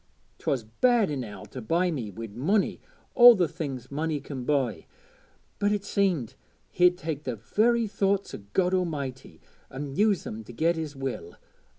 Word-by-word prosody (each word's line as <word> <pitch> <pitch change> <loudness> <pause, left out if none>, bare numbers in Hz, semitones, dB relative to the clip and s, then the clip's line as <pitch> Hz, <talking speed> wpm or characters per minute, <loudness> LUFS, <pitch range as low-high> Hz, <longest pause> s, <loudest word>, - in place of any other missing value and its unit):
'Twas 130 -4 -1
bad 215 - +2
enow 110 -8 -5
to 110 +5 -9
buy 170 +10 +1
me 125 -9 -4
wi' 115 +4 -7
munny 180 - 0 0.3
an' 240 -1 +10
the 175 -2 +2
things 140 -6 -6
munny 155 +1 -1
can 135 -3 -7
buy, 135 -6 0 0.7
but 205 0 +2
it 205 -1 0
seemed 185 - 0 0.4
he'd 180 0 +4
take 155 -4 -4
the 125 -4 -3
very 225 - +2
thoughts 200 -1 0
o' - - -6
God 185 -1 +2
A'mighty 140 - -3 0.3
and 135 0 -6
use 205 0 +2
them 110 +1 -6
to 120 - -10
get 165 +8 +1
his 155 -3 -5
will. 130 -11 -5
150 Hz, 165 wpm, -27 LUFS, 125-190 Hz, 0.7 s, an